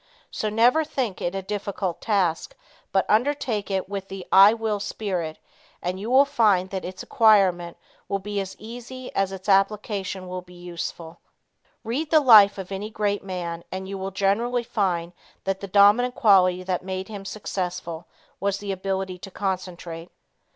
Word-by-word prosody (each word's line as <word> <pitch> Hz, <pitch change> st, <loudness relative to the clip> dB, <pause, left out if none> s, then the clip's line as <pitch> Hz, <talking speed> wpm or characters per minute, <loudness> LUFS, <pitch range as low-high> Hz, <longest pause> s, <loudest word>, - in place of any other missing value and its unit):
So 215 Hz, -, -2 dB
never 240 Hz, +8 st, +4 dB
think 250 Hz, -10 st, -3 dB
it 175 Hz, +2 st, -2 dB
a 195 Hz, -, -3 dB
difficult 200 Hz, -2 st, -3 dB
task, 200 Hz, -, 0 dB, 0.4 s
but 190 Hz, -, +2 dB
undertake 240 Hz, -3 st, 0 dB
it 190 Hz, -1 st, -1 dB
with 195 Hz, -1 st, -5 dB
the 195 Hz, -1 st, -8 dB
"I 195 Hz, +2 st, +9 dB
Will 220 Hz, -2 st, -2 dB
Spirit" 185 Hz, -6 st, -3 dB, 0.4 s
and 180 Hz, +1 st, -3 dB
you 215 Hz, +4 st, -5 dB
will 265 Hz, +3 st, +6 dB
find 210 Hz, -10 st, +2 dB
that 190 Hz, -1 st, -4 dB
its 185 Hz, +1 st, -7 dB
acquirement 190 Hz, -6 st, +3 dB, 0.3 s
will 200 Hz, -, 0 dB
be 205 Hz, +1 st, -4 dB
as 190 Hz, 0 st, -7 dB
easy 245 Hz, +3 st, -9 dB
as 195 Hz, -1 st, 0 dB
its 190 Hz, 0 st, -8 dB
application 195 Hz, -1 st, 0 dB
will 180 Hz, 0 st, -5 dB
be 180 Hz, 0 st, -17 dB
useful. 170 Hz, -1 st, -7 dB, 0.6 s
Read 265 Hz, +8 st, -2 dB
the 315 Hz, -, +6 dB
life 215 Hz, -8 st, +7 dB
of 195 Hz, -1 st, -7 dB
any 200 Hz, +2 st, -4 dB
great 205 Hz, -2 st, -1 dB
man, 175 Hz, -3 st, -5 dB
and 190 Hz, 0 st, -5 dB
you 195 Hz, -, -5 dB
will 190 Hz, 0 st, -4 dB
generally 225 Hz, +6 st, 0 dB
find 180 Hz, -6 st, -1 dB, 0.3 s
that 195 Hz, 0 st, -2 dB
the 200 Hz, -, -6 dB
dominant 205 Hz, +6 st, +5 dB
quality 185 Hz, -4 st, +4 dB
that 185 Hz, -1 st, -2 dB
made 190 Hz, 0 st, -4 dB
him 205 Hz, -3 st, -7 dB
successful 180 Hz, -5 st, -5 dB, 0.3 s
was 200 Hz, 0 st, 0 dB
the 200 Hz, 0 st, -5 dB
ability 190 Hz, -1 st, -3 dB
to 195 Hz, -, -9 dB
concentrate. 180 Hz, -3 st, -5 dB
195 Hz, 165 wpm, -24 LUFS, 185-215 Hz, 0.6 s, I